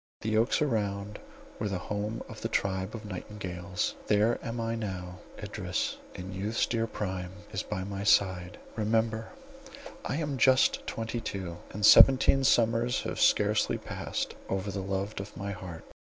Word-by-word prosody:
The 110 0 0
oaks 115 +7 +3
around 105 -5 -1 0.4
were 105 - -1
the 95 - -1
home 105 +4 -3
of - - -10
a - - +1
tribe 95 +2 -1
of 110 -1 -8
nightingales—there 100 +2 -1
am 115 +1 -4
I 115 0 -1
now; 90 -5 -5 0.2
Idris, - - -3 0.2
in 95 +1 -6
youth's 105 +4 0
dear 115 -1 0
prime, 95 -4 -4 0.2
is 95 - -2
by 95 -3 -4
my 100 0 -4
side 95 -3 +3 0.2
—remember, 110 +1 0 0.7
I - - -2
am 145 -4 -2
just 130 +2 +4
twenty 115 +1 -3
two, 95 -5 -4
and 105 0 0
seventeen 135 +3 +8
summers 120 -1 +3
have - - -3
scarcely - - +3
passed - - -4 0.2
over 95 +1 -1
the 95 0 -3
beloved 95 +2 -3
of 100 +2 -8
my 100 0 -3
heart. 90 -4 -7
105 Hz, 155 wpm, -29 LUFS, 95-115 Hz, 0.7 s, seventeen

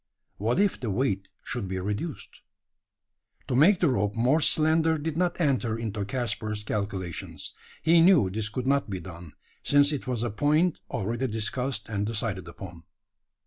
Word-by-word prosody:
What 115 - 0
if 200 -1 +2
the 120 - -3
weight 100 -3 0 0.2
should 120 -6 -3
be 95 0 -3
reduced? 105 - -5 1.1
To 125 - -1
make 170 +8 +5
the 170 - +4
rope 105 -5 0
more 130 +7 +3
slender 160 +1 +3
did 155 +1 -3
not 175 +1 0
enter 125 - +1
into 110 -3 -3
Caspar's 110 -2 -2
calculations. 100 -5 -4 0.3
He 165 +1 +6
knew 165 - +5
this 105 +1 -2
could 125 +4 -4
not 140 -3 +1
be 95 -2 -3
done: 85 -2 -10 0.3
since 145 0 +4
it 145 -4 -4
was 120 -3 -1
a 120 - -1
point 150 - +2
already 120 +6 -2
discussed 115 +2 -2
and 105 -2 -2
decided 105 -5 -2
upon. 85 -1 -10
115 Hz, 160 wpm, -27 LUFS, 100-145 Hz, 1.1 s, He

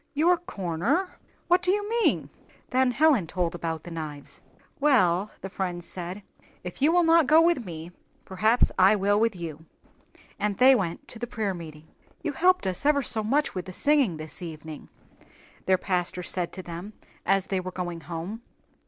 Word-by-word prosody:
"Your 335 +5 +4
'corner'! 290 - -2 0.3
What 355 +1 +4
do 365 - 0
you 410 +2 +1
mean?" 465 +1 +1 0.4
Then 260 0 +3
Helen 265 - +3
told 175 0 -1
about 165 -2 -4
the 175 - -9
knives. 155 -3 -7 0.4
"Well," 210 -10 +3
the - - -5
friend 180 -3 -3
said, 180 +3 -6 0.4
"if 180 +5 -8
you 300 +3 +5
will 350 0 +4
not 330 -3 +5
go 310 +1 +7
with 330 - +2
me, 165 0 -7 0.3
perhaps 215 +6 +2
I 190 +3 +6
will 205 +1 +2
with 225 -2 +1
you," 160 -3 -7 0.8
and 205 -1 -1
they 260 +1 +7
went 180 -9 -2
to 230 - -9
the 240 - -4
prayer 215 -4 -2
meeting. 155 -3 -10 0.4
"You 310 - -1
helped 360 - +3
us 185 +5 -2
ever 285 -1 +3
so 220 -2 -1
much 280 +7 +1
with 185 -2 -4
the 185 - -8
singing 280 - +2
this 155 +1 -8
evening," 160 -3 -8 0.8
their 185 0 +4
pastor 180 -1 -2
said 175 -1 -3
to 185 - -7
them 175 +5 -8 0.3
as 195 -1 +2
they 190 - -1
were 185 0 -5
going 175 -2 -5
home. 170 +8 -6
195 Hz, 180 wpm, -26 LUFS, 175-275 Hz, 0.8 s, go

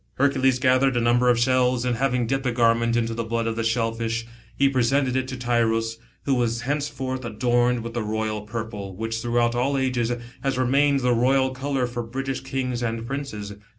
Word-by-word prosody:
Hercules 135 -2 +2
gathered 130 0 +3
a - - +3
number 120 +1 +3
of 120 - +5
the 120 - +3
shells, 125 -1 +2
and 125 -1 +1
having 125 -2 +1
dipped 135 +2 -1
a - - +1
garment 115 0 +2
in 120 -1 +2
the 115 0 -3
blood 115 0 -2
of 115 -1 -1
the 115 - -2
shellfish, 115 0 -1 0.3
he 140 - +4
presented 130 0 +1
it 130 0 0
to 130 0 -5
Tyros, 115 -2 0 0.2
who 140 - +1
was 120 -2 0
henceforth 135 -1 -3
adorned 120 +1 +1
with 115 0 -6
the 120 - -2
royal 110 0 -2
purple, 105 -3 -6
which 115 +2 -3
throughout 120 0 +1
all 130 +3 0
ages 125 -3 0 0.3
has 135 -2 -1
remained 140 +2 +3
the 125 -1 +2
royal 130 +2 +2
colour 135 0 -1
for 120 0 -4
British 135 +3 -4
kings 125 -2 -3
and 115 -1 -2
princes. 120 -6 -5
120 Hz, 195 wpm, -24 LUFS, 115-130 Hz, 0.3 s, of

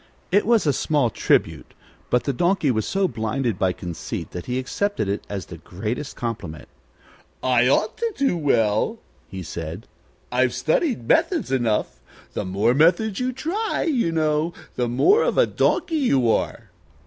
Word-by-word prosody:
It 205 +3 +3
was 230 -5 +4
a 145 - +3
small 135 -3 +1
tribute, - - 0 0.3
but 125 - +2
the 140 - -1
Donkey 175 0 +2
was 110 -3 -1
so 195 -1 +1
blinded 115 - -2
by 95 -1 +2
conceit 90 -2 -6
that 90 - -7
he 125 0 -1
accepted 200 - -1
it 100 +1 -2
as 100 -3 -4
the 85 - -10
greatest 110 - -5
compliment. 100 -10 -5 0.8
"I 125 -1 +3
ought 210 - +1
to 465 0 -1
sing 270 -12 0
well," 110 -7 +2 0.3
he 95 -1 -7
said. 80 0 -6 0.4
"I've 125 0 +2
studied 155 - 0
methods 130 - +2
enough. 120 -5 0 0.3
The - - -3
more 100 +6 +2
methods 175 - +3
you 255 0 0
try, 345 - -2
you 250 - +1
know, 155 +1 0 0.2
the 125 - 0
more 380 - +4
of - - 0
a - - +6
donkey 325 - 0
you 135 - +3
are." - - -2
130 Hz, 160 wpm, -23 LUFS, -, 0.8 s, a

